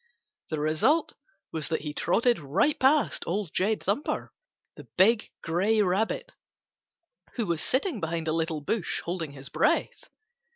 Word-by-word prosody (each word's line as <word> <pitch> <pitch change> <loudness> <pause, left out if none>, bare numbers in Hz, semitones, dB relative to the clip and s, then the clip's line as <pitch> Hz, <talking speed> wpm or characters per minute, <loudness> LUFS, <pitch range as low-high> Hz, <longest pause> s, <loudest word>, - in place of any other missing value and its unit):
The 155 - -2
result 160 - +2 0.4
was 160 -2 -3
that 160 - -1
he 150 -1 -5
trotted 235 +9 +2
right 170 - +1
past 280 +3 +3
Old 185 -2 -2
Jed 210 +3 0
Thumper, 210 +10 -2 0.4
the - - -12
big 215 +4 +4
gray 190 +7 +1
Rabbit, 195 +4 0 1.0
who 235 - -1
was 170 -4 0
sitting 275 - +1
behind 165 -1 -3
a 155 - +1
little 160 -1 -1
bush 195 +6 -2
holding 170 -4 -4
his 140 -1 -10
breath. - - 0
180 Hz, 140 wpm, -27 LUFS, 160-225 Hz, 1.0 s, big